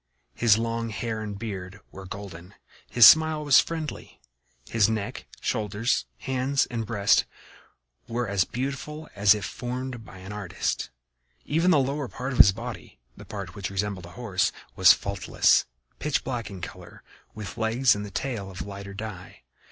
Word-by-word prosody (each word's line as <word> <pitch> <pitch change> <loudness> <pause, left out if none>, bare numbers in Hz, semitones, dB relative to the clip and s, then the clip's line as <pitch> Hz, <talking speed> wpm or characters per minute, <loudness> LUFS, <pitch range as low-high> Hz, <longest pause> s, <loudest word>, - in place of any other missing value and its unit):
His 115 -3 +4
long 115 0 -2
hair 110 0 -3
and 105 -2 -5
beard 100 -3 -6
were 95 0 -10
golden; 95 -2 -9 0.3
his 120 -2 +8
smile 160 +1 +7
was 145 -2 +7
friendly; 160 -2 -4 0.5
his 110 -2 +3
neck, 110 -2 -3
shoulders, 105 - 0
hands 130 - 0
and 115 -3 -3
breast 100 -2 +3 0.8
were 120 0 -2
as 100 -2 +2
beautiful 140 - -5
as 100 0 +5
if 105 -1 -4
formed 125 +1 -5
by 95 - -13
an 95 +2 -9
artist. 95 -4 -3 0.6
Even 165 +4 +2
the 180 - +6
lower 140 +1 0
part 130 +3 -5
of 125 - -4
his 100 - +10
body, 80 - -8 0.2
the - - -12
part 100 -4 -7
which 95 -1 -4
resembled 100 -2 -3
a - - -13
horse, 105 -7 0 0.2
was 95 -3 +8
faultless, 100 +4 +2 0.3
pitch 150 -1 0
black 120 -3 -4
in 95 -3 -9
color, - - -10 0.3
with 105 -4 -7
legs 115 +3 +3
and 105 0 -5
tail 115 -8 -3
of 95 -3 -7
lighter 100 0 -8
dye. 100 -4 -8
110 Hz, 160 wpm, -26 LUFS, 100-125 Hz, 0.8 s, his